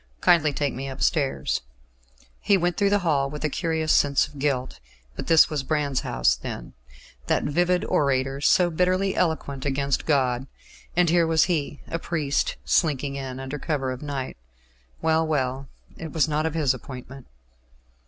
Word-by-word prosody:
Kindly 165 Hz, -4 st, +4 dB
take 140 Hz, -1 st, -1 dB
me 135 Hz, +2 st, -5 dB
upstairs." 135 Hz, +1 st, 0 dB, 0.8 s
He 200 Hz, -, +3 dB
went 175 Hz, -1 st, 0 dB
through 200 Hz, -1 st, +2 dB
the 205 Hz, -, +3 dB
hall 140 Hz, -4 st, +2 dB
with 150 Hz, +2 st, -7 dB
a 155 Hz, -, +1 dB
curious 160 Hz, -1 st, -1 dB
sense 140 Hz, -1 st, +3 dB
of 145 Hz, -, -13 dB
guilt. 130 Hz, -, -1 dB, 0.4 s
This 165 Hz, -, +5 dB
was 150 Hz, -3 st, -2 dB
Brand's 140 Hz, -1 st, 0 dB
house -, -, +1 dB
then -, -, -7 dB, 0.5 s
that -, -, +1 dB
vivid 175 Hz, +4 st, +1 dB
orator, 135 Hz, -1 st, 0 dB
so 175 Hz, +3 st, +4 dB
bitterly 185 Hz, +3 st, +1 dB
eloquent 140 Hz, -5 st, -1 dB
against 140 Hz, 0 st, -1 dB
God; 130 Hz, -3 st, +1 dB, 0.5 s
and 175 Hz, 0 st, +4 dB
here 170 Hz, -1 st, +3 dB
was 160 Hz, -1 st, +4 dB
he, 150 Hz, -5 st, -2 dB
a 165 Hz, -, -3 dB
priest, 155 Hz, -5 st, -1 dB
slinking 145 Hz, -4 st, +1 dB
in 130 Hz, -1 st, -5 dB
under 135 Hz, +2 st, -5 dB
cover 140 Hz, -5 st, -2 dB
of 130 Hz, -, -6 dB
night. 140 Hz, -, -5 dB, 0.7 s
Well, 160 Hz, 0 st, +2 dB
well, 135 Hz, -3 st, -1 dB, 0.3 s
it 160 Hz, -2 st, -7 dB
was 160 Hz, 0 st, +2 dB
not 155 Hz, +1 st, 0 dB
of 160 Hz, -, -4 dB
his 145 Hz, -5 st, +2 dB
appointment. 130 Hz, +1 st, -10 dB
145 Hz, 160 wpm, -25 LUFS, 135-160 Hz, 0.8 s, This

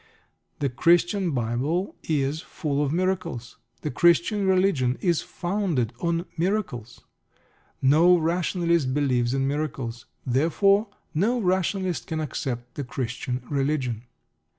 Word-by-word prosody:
The 140 Hz, -, 0 dB
Christian 175 Hz, -, +3 dB
Bible 135 Hz, -, -1 dB
is 150 Hz, 0 st, -1 dB
full 145 Hz, -1 st, -2 dB
of 140 Hz, -, -1 dB
miracles. 175 Hz, -8 st, -2 dB, 0.2 s
The 150 Hz, -, -3 dB
Christian 175 Hz, -, +3 dB
Religion 185 Hz, -10 st, +2 dB
is 175 Hz, -4 st, +1 dB
founded 175 Hz, -, -1 dB
on 170 Hz, +2 st, 0 dB
miracles. 165 Hz, -, -2 dB, 0.8 s
No 165 Hz, +7 st, +6 dB
rationalist 170 Hz, -3 st, +1 dB
believes 125 Hz, -4 st, +1 dB
in 135 Hz, 0 st, +1 dB
miracles. 135 Hz, -5 st, -3 dB, 0.2 s
Therefore 195 Hz, -, +3 dB, 0.3 s
no 215 Hz, +10 st, +1 dB
rationalist 185 Hz, -2 st, 0 dB
can 160 Hz, -1 st, -2 dB
accept 125 Hz, -5 st, -4 dB
the 145 Hz, -, -4 dB
Christian 125 Hz, 0 st, -4 dB
Religion. 135 Hz, -5 st, -1 dB
155 Hz, 110 wpm, -25 LUFS, 130-180 Hz, 0.8 s, No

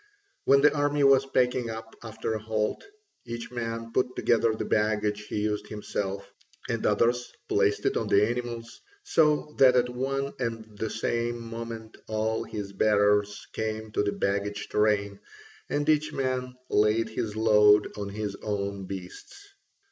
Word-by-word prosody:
When 140 Hz, 0 st, +6 dB
the 150 Hz, -, +5 dB
army 145 Hz, 0 st, +1 dB
was 135 Hz, 0 st, +5 dB
packing 125 Hz, -2 st, +1 dB
up 110 Hz, 0 st, -7 dB
after 110 Hz, 0 st, -4 dB
a 110 Hz, -, -2 dB
halt, 110 Hz, -1 st, -1 dB, 0.4 s
each 115 Hz, 0 st, -6 dB
man 115 Hz, -1 st, -4 dB
put 125 Hz, 0 st, 0 dB
together 115 Hz, -1 st, +2 dB
the -, -, -3 dB
baggage 105 Hz, -1 st, 0 dB
he 105 Hz, -, -2 dB
used 105 Hz, 0 st, -1 dB
himself, 100 Hz, -2 st, -4 dB, 0.4 s
and -, -, -2 dB
others 120 Hz, +1 st, +1 dB, 0.2 s
placed -, -, +1 dB
it -, -, +2 dB
on -, -, -1 dB
the 105 Hz, +1 st, +4 dB
animals: 120 Hz, -1 st, -5 dB, 0.2 s
so 150 Hz, -, +2 dB
that 130 Hz, -2 st, +7 dB
at 125 Hz, 0 st, +3 dB
one 135 Hz, +2 st, -2 dB
and 115 Hz, -3 st, -3 dB
the 110 Hz, +2 st, -3 dB
same 120 Hz, +2 st, -1 dB
moment 115 Hz, -1 st, -7 dB
all 110 Hz, +1 st, -1 dB
his 100 Hz, -2 st, -6 dB
bearers 105 Hz, 0 st, +2 dB
came 110 Hz, 0 st, -3 dB
to 105 Hz, -, +1 dB
the 105 Hz, 0 st, 0 dB
baggage 100 Hz, +1 st, -2 dB
train 100 Hz, -1 st, +1 dB, 0.5 s
and 145 Hz, 0 st, -1 dB
each 155 Hz, 0 st, +2 dB
man 130 Hz, -1 st, -2 dB, 0.2 s
laid 110 Hz, +2 st, +3 dB
his 110 Hz, -1 st, -3 dB
load 105 Hz, -1 st, +5 dB
on 100 Hz, -1 st, -4 dB
his 105 Hz, 0 st, -4 dB
own 100 Hz, -2 st, -3 dB
beasts. 100 Hz, -, -9 dB
110 Hz, 155 wpm, -27 LUFS, 105-125 Hz, 0.5 s, that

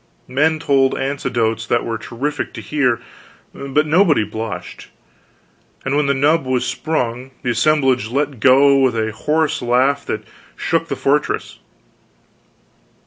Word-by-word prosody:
Men 150 Hz, +5 st, +1 dB
told 135 Hz, -3 st, +2 dB
anecdotes 115 Hz, -5 st, -1 dB
that -, -, +1 dB
were 115 Hz, -1 st, -3 dB
terrific 140 Hz, +5 st, -4 dB
to -, -, -6 dB
hear, 130 Hz, -6 st, 0 dB, 0.5 s
but 140 Hz, +2 st, -1 dB
nobody 160 Hz, -, +3 dB
blushed; 110 Hz, 0 st, -6 dB, 1.0 s
and 135 Hz, +1 st, 0 dB
when 145 Hz, -1 st, +2 dB
the 140 Hz, -, +2 dB
nub 150 Hz, +3 st, +2 dB
was 130 Hz, -1 st, -1 dB
sprung, 125 Hz, -5 st, -2 dB
the 125 Hz, -, 0 dB
assemblage 130 Hz, -2 st, +2 dB
let 140 Hz, 0 st, -2 dB
go 140 Hz, +3 st, +5 dB
with 130 Hz, -3 st, +2 dB
a 110 Hz, 0 st, -1 dB
horse 150 Hz, +7 st, 0 dB
laugh 130 Hz, +4 st, +2 dB
that 110 Hz, 0 st, -3 dB, 0.3 s
shook -, -, -1 dB
the -, -, -3 dB
fortress. -, -, -1 dB
135 Hz, 135 wpm, -19 LUFS, 120-145 Hz, 1.0 s, go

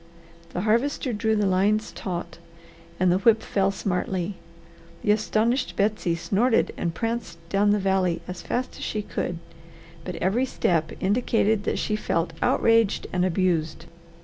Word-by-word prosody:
The 180 Hz, -, -1 dB
Harvester 235 Hz, +4 st, +1 dB
drew 220 Hz, +1 st, +1 dB
the 210 Hz, -1 st, +1 dB
lines 200 Hz, +3 st, +2 dB
taut, 175 Hz, -2 st, -5 dB, 0.6 s
and 185 Hz, -1 st, +4 dB
the 180 Hz, -, +2 dB
whip 220 Hz, +2 st, +4 dB
fell 195 Hz, -1 st, +1 dB
smartly. 190 Hz, -1 st, -2 dB, 0.7 s
The 210 Hz, -, +3 dB
astonished 220 Hz, +4 st, +1 dB
Betsy 200 Hz, -4 st, +1 dB
snorted 225 Hz, +8 st, +1 dB
and 170 Hz, -1 st, -3 dB
pranced 230 Hz, -6 st, -3 dB
down 200 Hz, +1 st, +3 dB
the 205 Hz, -, +4 dB
valley 190 Hz, -3 st, +1 dB
as 180 Hz, -1 st, -6 dB
fast 255 Hz, +1 st, -3 dB
as -, -, -6 dB
she 210 Hz, -1 st, -2 dB
could, 175 Hz, -3 st, -3 dB, 0.7 s
but 180 Hz, 0 st, -5 dB
every 205 Hz, +10 st, +1 dB
step 165 Hz, -9 st, 0 dB
indicated 215 Hz, 0 st, +1 dB
that -, -, 0 dB
she 215 Hz, -, -1 dB
felt 165 Hz, -5 st, -1 dB
outraged 225 Hz, -2 st, +3 dB
and 180 Hz, -1 st, +1 dB
abused. 165 Hz, -3 st, 0 dB
200 Hz, 150 wpm, -25 LUFS, 180-220 Hz, 0.7 s, and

